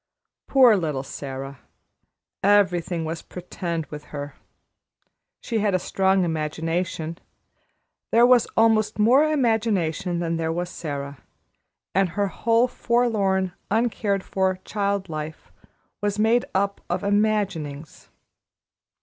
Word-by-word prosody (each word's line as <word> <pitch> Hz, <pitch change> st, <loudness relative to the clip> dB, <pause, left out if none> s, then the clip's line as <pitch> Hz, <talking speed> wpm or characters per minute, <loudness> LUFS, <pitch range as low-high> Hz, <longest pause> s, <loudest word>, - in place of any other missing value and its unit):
Poor 255 Hz, -5 st, +6 dB
little 155 Hz, -8 st, -2 dB
Sara! 135 Hz, -1 st, -7 dB, 0.8 s
everything 180 Hz, -4 st, +2 dB
was 160 Hz, +1 st, -4 dB
"pretend" 170 Hz, -2 st, -5 dB
with 150 Hz, -1 st, -8 dB
her. 145 Hz, -1 st, -7 dB, 1.1 s
She 230 Hz, -3 st, -2 dB
had 205 Hz, -2 st, +1 dB
a -, -, +4 dB
strong 190 Hz, +1 st, +1 dB
imagination; 165 Hz, +1 st, -2 dB, 0.9 s
there 235 Hz, +1 st, +6 dB
was 245 Hz, -2 st, +5 dB
almost 220 Hz, -2 st, +3 dB
more 240 Hz, +7 st, +5 dB
imagination 205 Hz, -, 0 dB
than 170 Hz, -1 st, -1 dB
there 160 Hz, 0 st, -1 dB
was 175 Hz, +2 st, -3 dB
Sara, 140 Hz, -4 st, -6 dB, 0.7 s
and 190 Hz, -1 st, +2 dB
her 200 Hz, +3 st, -1 dB
whole 230 Hz, +6 st, +2 dB
forlorn, 210 Hz, -7 st, +1 dB, 0.2 s
uncared 210 Hz, -3 st, 0 dB
for 190 Hz, -1 st, 0 dB
child 200 Hz, -2 st, -1 dB
life 155 Hz, -1 st, -7 dB, 0.5 s
was 205 Hz, 0 st, -1 dB
made 225 Hz, +3 st, +3 dB
up 200 Hz, +1 st, 0 dB
of 175 Hz, +1 st, -1 dB
imaginings. 200 Hz, -8 st, -1 dB
190 Hz, 110 wpm, -24 LUFS, 165-215 Hz, 1.1 s, Poor